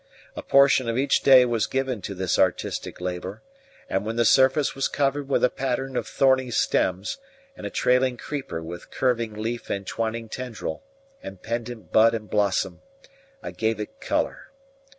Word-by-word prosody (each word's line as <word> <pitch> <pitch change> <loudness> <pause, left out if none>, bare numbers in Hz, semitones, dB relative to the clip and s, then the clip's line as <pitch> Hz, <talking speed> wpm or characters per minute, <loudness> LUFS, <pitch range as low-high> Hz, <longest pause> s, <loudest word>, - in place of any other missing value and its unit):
A - - -5
portion 135 -3 +4
of 115 - -1
each 135 +1 +2
day 130 -2 +7
was 115 -4 0
given 130 -4 -2
to 100 - -6
this 95 -1 -1
artistic - - 0
labour; 90 +3 -5 0.4
and 95 +1 -1
when 110 +2 -3
the 120 0 +2
surface 135 +4 +4
was 135 - 0
covered 140 0 -1
with - - +1
a 125 - +5
pattern 135 0 -3
of - - -2
thorny 130 -1 +2
stems, 95 - 0 0.4
and - - -6
a - - -5
trailing 125 0 +2
creeper 135 - -5
with 85 +2 -8
curving 115 -4 0
leaf 115 +3 -4
and 100 -1 -3
twining 115 +3 -3
tendril, 115 -5 -5 0.4
and 95 -1 -10
pendent 115 -5 -5
bud 115 +1 +5
and 110 -2 -7
blossom, 100 -3 0 0.6
I - - -5
gave 110 -1 -1
it 270 - -7
colour. - - -2
115 Hz, 170 wpm, -25 LUFS, 105-130 Hz, 0.6 s, day